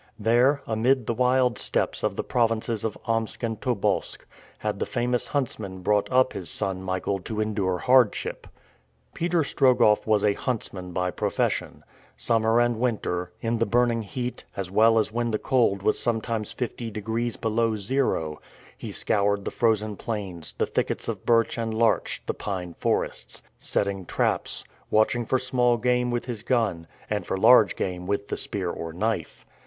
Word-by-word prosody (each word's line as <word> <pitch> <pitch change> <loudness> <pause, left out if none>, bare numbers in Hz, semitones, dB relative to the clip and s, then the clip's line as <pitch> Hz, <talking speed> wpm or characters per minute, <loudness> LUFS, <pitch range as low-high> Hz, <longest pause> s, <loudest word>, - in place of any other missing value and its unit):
There, 120 +6 +3
amid 120 +3 +1
the 115 - 0
wild 125 -1 +2
steppes - - -1
of - - -1
the - - -2
provinces 115 -2 0
of 110 - -2
Omsk 115 0 -2
and 115 -2 -2
Tobolsk, 125 -7 -1 0.3
had - - -3
the - - -1
famous 120 0 -1
huntsman 105 -9 -3
brought 105 +4 +1
up 130 0 +4
his 90 - -5
son 95 -1 -2
Michael 95 +1 -2
to 105 +4 -5
endure 100 -4 0
hardship. 125 +2 +2 0.7
Peter 170 -1 +1
Strogoff 125 -7 +3
was 105 -2 +3
a 105 - +4
huntsman 100 -7 -4
by 90 0 -1
profession. - - -1 0.3
Summer 115 0 +2
and 120 -1 +2
winter 90 -7 -1
in 115 0 -1
the 115 - +2
burning 120 +1 +2
heat, 125 +4 -5
as 95 -2 -4
well 115 +3 +5
as 110 -1 +2
when 120 +1 -1
the 110 - 0
cold 105 -6 +1
was 110 - +2
sometimes 115 -2 -1
fifty 120 -1 -4
degrees 110 +2 -3
below 115 0 +1
zero 100 - 0 0.3
he - - -7
scoured 100 -1 0
the - - -2
frozen 110 -2 +1
plains, 95 -7 -4
the - - 0
thickets - - -2
of - - -5
birch 115 0 +3
and 115 -1 -2
larch, 115 0 +1
the - - -1
pine 90 -4 -5
forests; - - -1 0.2
setting 100 -3 -1
traps; - - -1 0.3
watching 110 +2 +2
for 130 - +2
small 125 -2 +2
game 125 +1 +1
with 120 0 -2
his 120 -4 -4
gun, 105 -11 0 0.2
and 105 -4 -2
for - - -1
large 110 -1 +6
game 90 -1 -3
with 100 0 -2
the - - -1
spear 95 -4 -2
or 85 -1 -6
knife. 105 -1 -3
110 Hz, 165 wpm, -26 LUFS, 100-120 Hz, 0.7 s, large